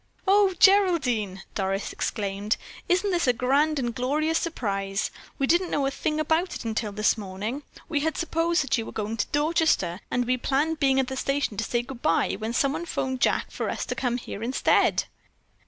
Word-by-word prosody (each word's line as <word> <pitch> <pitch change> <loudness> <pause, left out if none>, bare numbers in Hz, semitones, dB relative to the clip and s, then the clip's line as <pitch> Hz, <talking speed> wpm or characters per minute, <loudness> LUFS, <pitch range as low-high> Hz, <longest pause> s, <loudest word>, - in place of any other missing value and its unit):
"Oh, 390 -1 +4
Geraldine," 265 - +3
Doris 195 0 -2
exclaimed, 205 0 -2 0.3
"isn't 375 +3 +2
this 345 -5 +1
a 250 - +5
grand 280 +6 +2
and 240 -3 -1
glorious 305 +6 0
surprise. 195 - -2 0.3
We 275 - +1
didn't 345 +5 +2
know 280 - 0
a 270 - 0
thing 305 +2 -2
about 320 +4 +1
it - - -7
until 220 -1 -2
this 215 +2 +1
morning. 205 +7 -4 0.3
We 310 -3 0
had 320 +2 -1
supposed 335 -1 +1
that 270 -3 0
you 225 - -4
were - - -6
going 220 +1 -3
to 205 - 0
Dorchester, 295 - +1
and 245 0 0
we 255 +1 +1
planned 295 +5 0
being 270 -2 +3
at 265 - +2
the 265 +1 -5
station 275 -4 -1
to 220 - 0
say 240 +1 -1
good 245 -1 -9
bye 165 - +2
when 220 +1 -3
someone 295 +7 0
phoned 260 -5 -2
Jack - - +1
for - - -3
us - - -3
to - - -3
come 245 -2 -1
here 225 -4 -7
instead." 245 +4 +2
265 Hz, 195 wpm, -26 LUFS, 220-320 Hz, 0.3 s, a